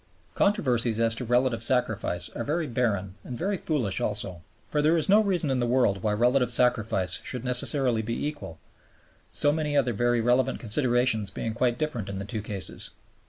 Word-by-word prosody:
Controversies 125 - +1
as 115 0 +3
to 120 +2 -2
relative 125 -1 +1
sacrifice 110 -7 0
are 115 - -5
very 155 +5 -1
barren 110 -7 -1
and 125 - -7
very 195 - -1
foolish 140 - -1
also; 100 -4 0 0.3
for 150 - +1
there 155 +3 +3
is 160 - 0
no 205 +3 +6
reason 180 -8 0
in 130 - 0
the 120 - 0
world 120 -6 +2
why 105 - 0
relative 125 +4 +2
sacrifice 115 -6 +1
should 125 0 -5
necessarily 125 -1 +1
be 115 +5 -3
equal, 145 - -6 0.7
so 145 - +2
many 150 -1 -1
other 125 -4 +2
very 120 +2 +1
relevant 125 +2 +1
considerations 120 -3 +2
being 110 +4 -4
quite 120 +1 0
different 125 -10 -3
in 100 - -5
the 100 - -5
two 110 0 -4
cases. 100 -2 -4
120 Hz, 180 wpm, -26 LUFS, 110-135 Hz, 0.7 s, no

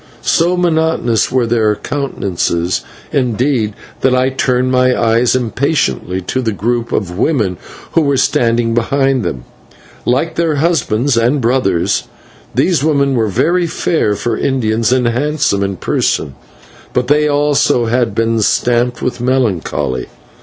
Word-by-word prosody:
So 175 +2 +2
monotonous 160 -10 +1
were 125 -2 +2
their 110 -2 +1
countenances, 95 - -2 0.3
indeed, 125 -4 0 0.2
that 130 -1 +2
I 130 +1 +2
turned 130 -1 0
my 130 0 +2
eyes 115 +2 +2
impatiently 115 - -1
to 130 +8 -2
the 115 -3 -1
group 115 +4 -2
of 90 -2 -2
women 110 - 0 0.3
who 165 - +3
were 140 -2 +1
standing 115 -2 +1
behind 135 +2 +1
them. 65 -9 -4 0.6
Like 135 +7 0
their 165 -2 +1
husbands 145 -5 +1
and 120 +5 +2
brothers, 115 -8 0 0.5
these 170 -7 +2
women 140 -3 +2
were 115 -3 +1
very 170 - +1
fair 155 -9 0
for 115 +2 -2
Indians, 115 -4 0
and 130 -1 +2
handsome 135 -3 0
in 100 -1 -2
person, 70 - -1 0.6
but 125 0 0
they 150 +2 +3
also 145 -4 +2
had 120 0 0
been 115 0 +1
stamped 120 +3 +1
with 125 -1 -2
melancholy. 110 - -1
125 Hz, 135 wpm, -15 LUFS, 110-140 Hz, 0.6 s, who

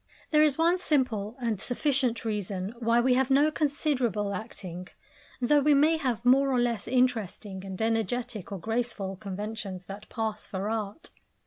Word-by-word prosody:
This 305 -1 +5
is - - -11
one 340 +3 +3
simple 245 - 0
and 230 -5 -1
sufficient 255 -2 +1
reason 200 -2 -3
why 230 0 +3
we 250 +1 +3
have 260 +1 +2
no 285 +3 +4
considerable 265 - 0
acting; 185 -4 -7 0.5
though 290 +4 +4
we 290 +1 +4
may 310 +3 +4
have 250 -6 -2
more 270 +2 +5
or 255 -2 +2
less 235 -4 0
interesting 225 -6 0
and 190 -1 -7
energetic 225 -1 -1
or 200 - -3
graceful 220 -1 -2
conventions 200 -1 -6
that 200 +2 -9
pass 220 -2 -3
for 195 +2 -3
art. 215 +6 -4
230 Hz, 155 wpm, -28 LUFS, 205-265 Hz, 0.5 s, This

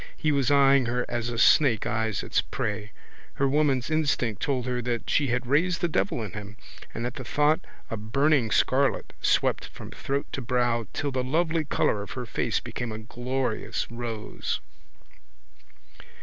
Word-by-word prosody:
He 155 - +1
was 140 -4 +2
eying 140 -2 +5
her 125 +1 0
as 120 0 -2
a 120 - -4
snake 120 -2 +5
eyes 110 -2 -1
its - - +1
prey. 105 -1 -4 0.4
Her 140 - +2
woman's 140 -1 +1
instinct 140 -9 0
told 130 -4 0
her 125 -1 -1
that 120 -1 -2
she 145 - +3
had 125 +1 0
raised 165 +7 +2
the 175 - +1
devil 105 - 0
in 105 - -5
him 105 0 -8 0.3
and 120 - -4
at 125 - -3
the 130 - -6
thought 150 +5 +2 0.3
a - - -1
burning 130 +3 +2
scarlet 135 +5 +2
swept - - +2
from - - -10
throat 140 +1 -2
to 135 - -3
brow 120 -2 0
till 145 - -2
the 130 -1 -1
lovely 160 +4 +1
colour 105 -6 +1
of 100 - -7
her 125 -1 -4
face 115 -1 -1
became 120 0 -5
a 110 - -4
glorious 120 +1 -2
rose. 115 -2 -4
125 Hz, 170 wpm, -27 LUFS, 115-140 Hz, 0.4 s, eying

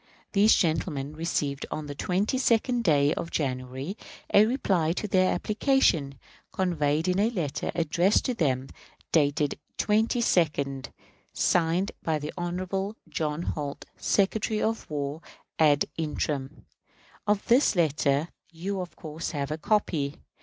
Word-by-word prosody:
These 210 +2 +5
gentlemen 155 -4 0
received 150 -3 -2
on 155 - -4
the 145 - -5
22d 230 - +1
day 145 -7 +3
of 170 - -4
January 130 +4 -3 0.4
a 210 +2 +7
reply 190 - +1
to 210 - -3
their 185 -1 +3
application, 180 - +1 0.3
conveyed 160 -3 0
in 185 +1 +2
a 215 +3 +3
letter 170 - -2
addressed 170 +4 +2
to 255 - 0
them, 135 - 0 0.4
dated 145 -2 +2 0.2
the - - 0
22d, 175 - +1 0.5
signed 175 +3 +2
by 160 -1 0
the 150 0 -5
Hon. 185 +3 -3
J. 155 0 -2
Holt, 145 -4 -4
Secretary 215 +2 +1
of 225 +1 -1
War 145 +1 -3 0.4
ad 150 -2 +5
interim. 150 -2 -3 0.6
Of 205 -1 +1
this 245 -1 +4
letter 150 -2 +1 0.2
you 185 +4 -3
of 175 -3 -8
course 155 +1 -5
have 140 0 -2
a 155 - -3
copy. 155 -7 0
165 Hz, 130 wpm, -27 LUFS, 145-200 Hz, 0.6 s, a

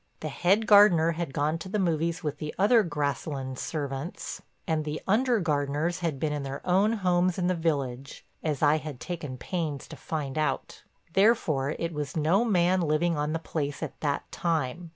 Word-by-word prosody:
The 155 - -3
head 190 +9 +2
gardener 195 -6 +6
had 170 -3 -3
gone 150 +4 0
to 185 - -7
the 210 - -1
movies 170 -1 0
with 150 -1 -3
the 150 -1 -5
other 215 +4 +5
Grasslands 140 - -3
servants, 145 +1 -4 0.2
and 160 -3 0
the 150 +1 -3
under 235 +3 +3
gardeners 150 +1 0
had 165 -6 -2
been 150 0 0
in 145 - -2
their 135 0 -6
own 195 +5 +3
homes 180 -3 +1
in 180 - 0
the 185 - +2
village 140 -6 -2 0.2
as 150 -2 -2
I 150 +1 +5
had 150 -4 -7
taken 155 -7 -5
pains 155 -2 -3
to - - -8
find 150 -2 -4
out. 145 -4 -2 0.3
Therefore 160 - +2
it 165 0 -3
was 150 -1 -4
no 165 +8 +3
man 185 -4 +3
living 165 +1 +1
on 150 0 -1
the 165 - 0
place 145 -3 -3
at - - -6
that 145 -2 -2
time. 165 0 -2
160 Hz, 185 wpm, -28 LUFS, 145-180 Hz, 0.3 s, gardener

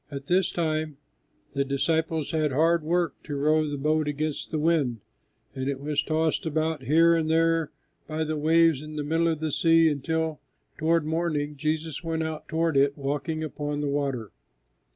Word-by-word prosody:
At 140 -1 -7
this 180 +3 +2
time 155 -3 -2 0.6
the 140 - +1
disciples 160 +3 0
had 155 -3 +1
hard 165 +5 +3
work 170 0 -1
to 145 - -6
row 155 +2 +2
the 145 - -3
boat 155 +2 +1
against 150 +1 -3
the 155 - -2
wind, 150 -8 +1 0.5
and 130 +1 -3
it 140 -1 -3
was 145 +1 0
tossed 160 0 0
about 160 -1 -1
here 165 +5 +5
and 160 -1 +1
there 165 -1 +2 0.4
by 155 0 -2
the 155 0 -2
waves 160 -1 +3
in 155 0 -9
the 150 - -2
middle 165 +3 +1
of 160 -2 -1
the 155 -1 -1
sea 165 +2 +4
until, 160 +2 -2 0.4
toward 165 0 +2
morning, 155 -2 -1
Jesus 155 +2 -2
went 165 -1 -1
out 160 -1 -5
toward 160 -2 0
it, 140 +1 +3
walking 145 +3 -2
upon 145 -1 -3
the 145 - -1
water. 135 -6 -2
155 Hz, 175 wpm, -26 LUFS, 145-160 Hz, 0.6 s, here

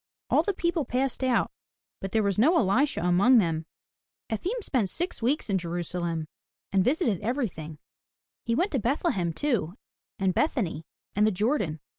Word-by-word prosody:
All - - +5
the 405 - 0
people 340 -3 0
passed 260 +1 -1
out, 250 -3 +2 0.5
but 195 - -5
there 220 -1 +2
was 200 -1 0
no 320 +10 +5
Elisha 250 - +2
among 190 +9 +5
them. 165 -5 +1 0.6
Efim 390 - -2
spent 235 - 0
six 350 - -3
weeks 265 +6 +1
in 195 -3 +1
Jerusalem, 170 -1 -3 0.4
and 195 -1 +3
visited 250 - +1
everything. 200 - -3 0.7
He 230 - 0
went 365 +9 +1
to 270 - +1
Bethlehem 235 - 0
too, 195 - -1 0.4
and 190 -3 +1
Bethany, 195 - -1 0.3
and 210 +1 +4
the - - +3
Jordan. 205 - 0
215 Hz, 155 wpm, -27 LUFS, 180-270 Hz, 0.7 s, All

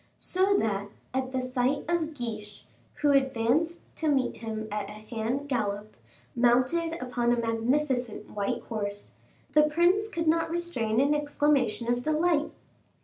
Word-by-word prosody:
So 385 +2 +2
that, 205 - -1 0.2
at 260 0 -1
the 260 -1 -1
sight 255 +2 0
of 325 -2 0
Guiche, 215 -5 -6 0.3
who 295 -1 +2
advanced 270 +5 +2 0.2
to 315 - 0
meet 270 -3 +1
him 220 -1 -5
at 205 -1 -3
a - - -8
hand 225 +6 -3
gallop, 210 -5 -2 0.4
mounted 255 +8 +2
upon 245 -1 0
a 240 - +2
magnificent 240 0 0
white 200 -1 -2
horse, 205 -2 -5 0.4
the 305 - +6
prince 345 +8 +3
could 335 -5 -2
not 330 +1 +3
restrain 325 -11 0
an 280 +2 +4
exclamation 290 -5 +1
of 240 0 +1
delight. 310 +2 +2
255 Hz, 145 wpm, -28 LUFS, 225-305 Hz, 0.4 s, the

